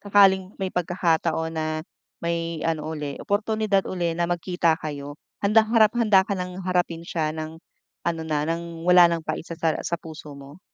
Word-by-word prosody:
sakaling 195 -2 +4
may 190 -1 -3
pagkakataon 165 -2 0
na 160 -1 -2 0.6
may 170 -1 -2
ano 160 -2 -1
uli, 150 -3 -4
oportunidad 210 -1 +1
uli 175 -3 -1
na 170 0 0
magkita 175 -2 +1
kayo, 145 -1 -6 0.2
handang 215 +2 +5
harap 215 -1 +6
handa 210 -5 +5
ka 200 - -3
ng 180 +1 -5
harapin 175 -2 0
siya 155 -2 -2
ng 155 0 -6 0.5
ano 165 -1 0
na, 150 -1 -1
ng 170 0 -4
wala 180 -1 +7
ng 165 - -1
pait - - -2
sa 170 -2 -8
sar 165 -2 +1
sa 170 -1 -2
puso 155 -2 -10
mo? 140 +5 -12
170 Hz, 175 wpm, -24 LUFS, 160-185 Hz, 0.6 s, wala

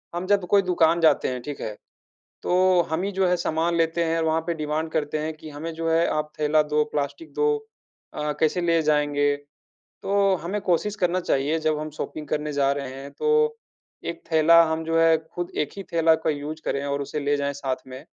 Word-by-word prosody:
हम 175 +1 -3
जब 200 -2 +2
कोई 200 +1 +5
दुकान 170 -2 +2
जाते 160 - +4
हैं, 125 -1 -3
ठीक 145 +3 -7
है। 105 - -4 0.7
तो 185 0 +3
हम 160 +2 0
ही 200 - -1
जो 190 0 +1
है 180 - +3
सामान 170 0 0
लेते 165 0 +1
हैं, 165 0 0
वहाँ 160 0 +1
पे 170 - 0
डिमांड 155 +1 -2
करते 155 -1 -1
हैं 155 +1 -3
कि 155 - -11
हमें 155 +3 -6
जो 165 0 -3
है 165 +1 +3
आप 150 0 -2
थैला 150 0 +3
दो, 150 0 +1
प्लास्टिक 150 - -3
दो 445 0 +2 0.6
अ, 150 0 -2
कैसे 160 +3 +2
ले 170 -1 +2
जाएँगे? 145 -1 +2 0.7
तो 195 -1 +2
हमें 195 +5 -2
कोशिश 200 +3 0
करना 180 -2 +1
चाहिए 150 -1 0
जब 155 -1 0
हम 155 0 -4
शॉपिंग 150 -1 -5
करने 150 0 -2
जा 140 -1 +2
रहे 140 -2 -5
हैं 135 +1 -9
तो, 455 0 +1 0.5
1 170 - -5
थैला 165 +1 +6
हम 160 0 -2
जो 165 0 +1
है 165 0 +5
खुद 165 +2 -7
एक 145 - -8
ही 195 - -5
थैला 165 -1 +4
का - - +1
यूज़ 150 +1 -4
करें 140 0 -1
और 140 0 -2
उसे 145 +2 -4
ले 145 0 +1
जाएँ 140 0 -1
साथ 135 -2 -2
में। 130 0 -8
160 Hz, 215 wpm, -24 LUFS, 150-175 Hz, 0.7 s, थैला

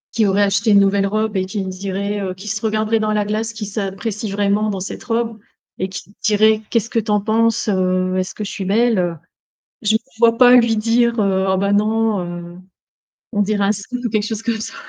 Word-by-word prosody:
qui 220 -3 +3
aurait 200 +1 +3
acheté 205 +2 +1
une 200 - +7
nouvelle 195 0 +2
robe 215 +1 -1
et 190 -1 0
qui 200 0 -3
me 185 - -4
dirait, 200 +2 -3
heu, 185 -2 -4
qui 195 +3 -11
se 215 0 -3
regarderait 220 0 +1
dans 215 0 0
la 210 -1 0
glace, 220 +2 -2
qui 215 -2 -6
s'apprécie 205 +1 -4
vraiment 205 +1 +1
dans 195 - -3
cette 190 - -6
robe 230 -1 -2 0.4
et 185 - -2
qui 195 +2 -9
dirait: 215 +1 +3
«Qu'est-ce 230 -1 0
que 230 - +1
tu 220 0 -6
en 210 0 +3
penses? 225 +2 +1
Heu, 185 -2 +1
est-ce 185 0 -3
que 215 - -5
je 205 - -5
suis 195 - -5
belle, 225 +2 +2
heu?» 175 -2 -1 0.7
Je 215 0 +2
me - - +4 0.2
vois 230 -1 +4
pas 245 -1 +7
lui 235 -2 +4
dire, 235 +2 +2
heu: 190 -2 +1
«Oh - - +2
bah 200 +1 0
non, 215 0 +1
heu, 175 0 -7 0.8
on 205 -2 +2
dirait 205 0 0
un 200 - +3
sumo,» 215 +5 -6
ou 235 - -1
quelque 215 -1 +1
chose 220 -1 -4
comme 230 -2 -1
ça. - - -6
210 Hz, 235 wpm, -19 LUFS, 195-220 Hz, 0.8 s, une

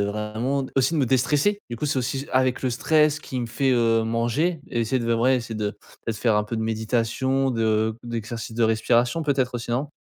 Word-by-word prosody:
vraiment, 105 +7 -1
aussi, 135 +4 +2
de - - +1
me 140 - +3
déstresser. 145 - +2
Du 120 - -5
coup, 135 - -4
c'est 140 -2 0
aussi 135 +3 -2
avec 130 0 +2
le 130 - +1
stress 150 +4 +2
qui 135 -4 -5
me 120 - -2
fait, 130 +4 0
heu, 115 -2 +3
manger, 120 +9 0
et 120 - -1
essayer 115 +3 0
de, 115 - +1
ouais, 125 +3 +3
essayer 115 -2 -5
de 105 -1 -3 0.3
de 115 - 0
faire 110 +1 +1
un 105 - +1
peu 115 +2 -4
de 110 - -2
méditation, 115 +4 0
de 110 -1 +1
d'exercices 115 -1 -5
de 115 - +3
respiration, 120 +6 +2
peut-être, 135 -4 0
aussi, 120 0 -4
non? 130 +5 -1
120 Hz, 215 wpm, -24 LUFS, 115-135 Hz, 0.3 s, me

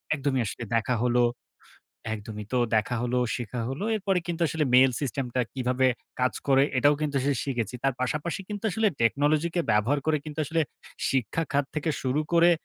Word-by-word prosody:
একদমই 135 -3 0
আসলে 110 - -5
দেখা 115 +2 +1
হলো। 125 0 +3 0.9
একদমই. 105 0 -7
তো 125 - +2 0.2
দেখা 110 +3 0
হলো, 125 +1 0 0.2
শেখা 120 0 -4
হল। 135 +2 -4 0.2
এরপরে 195 -2 +1
কিন্তু 170 -1 -2
আসলে 160 0 0
mail 130 +1 +7
system 135 -1 -2
টা 130 - +2
কিভাবে 130 0 +1 0.3
কাজ 125 0 +2 0.2
করে, 135 0 +5
এটাও 145 +3 +5
কিন্তু 150 -2 -1
শি 145 - +3
শিখেছি। 125 -5 -2
তার 135 -1 +2
পাশাপাশি 150 +8 -2
কিন্তু 210 0 -6
আসলে 220 +3 +2
technology 145 +7 +2
কে 175 - +2
ব্যবহার 110 +7 +3
করে 155 -1 +3
কিন্তু 155 -1 -8
আসলে 160 +3 0 0.5
শিক্ষা 135 +5 0
খাত 140 0 +2
থেকে 155 +1 -1
শুরু 130 +3 +1
করে 170 +1 +6
135 Hz, 180 wpm, -27 LUFS, 125-155 Hz, 0.9 s, mail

